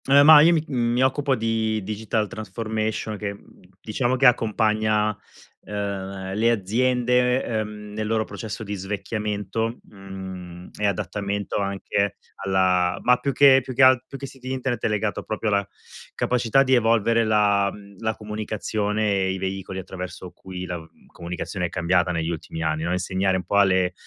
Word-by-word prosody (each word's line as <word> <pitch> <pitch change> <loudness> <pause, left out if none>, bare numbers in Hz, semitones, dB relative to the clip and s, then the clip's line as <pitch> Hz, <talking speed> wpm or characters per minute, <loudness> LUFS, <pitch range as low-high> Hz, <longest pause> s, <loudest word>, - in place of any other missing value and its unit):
Eh, 140 +1 +7
ma 150 0 +10
io 165 +3 +6
mi 160 -3 +2
mi 120 -1 +1
occupo 135 +1 +2
di 110 -1 0
digital 110 +1 -2
transformation, 110 +1 -3
che, 100 -1 -4 0.4
diciamo, 120 +3 -1
che 130 +2 +2
accompagna, 110 -2 +2 0.5
ehm, 95 -2 -4
le 110 +4 +2
aziende, 125 +4 +2
ehm, 105 -2 -4
nel 110 0 -3
loro 110 0 +1
processo 110 0 -6
di 105 -1 -5
svecchiamento, 105 +3 -3
mhmm, 95 -3 -9
e 105 - +2
adattamento 100 +1 -2
anche 100 0 -1 0.3
alla 95 -1 +2
ma 125 0 +5
più 140 - -1
che 135 0 +7
più 130 0 -7
che 130 - +5
alt 130 -1 +6
più 135 - -8
che 140 - -6
siti 130 -1 -8
internet, 130 -3 -2
è - - +4
legato 105 -1 -1
proprio 110 0 -3
alla 100 -1 +1 0.5
capacità 125 +2 +2
di 130 -1 +1
evolvere 115 -1 +3
la 105 -2 +3
mhmm, 100 -1 -14
la 110 0 -1
comunicazione 105 0 -2
e 95 0 +1
i - - -4
veicoli 95 0 -4
attraverso 90 -1 -7
cui 90 -1 -8
la 90 -2 -5 0.3
comunicazione 90 +1 -4
è - - -11
cambiata 90 +1 +1
negli 80 -1 -1
ultimi 80 0 -5
anni, 80 -1 -1
no, 85 +2 -1
insegnare 95 +1 0
un 90 - -4
po' 100 +4 0
alle 95 -2 +3
105 Hz, 160 wpm, -24 LUFS, 95-115 Hz, 0.5 s, ma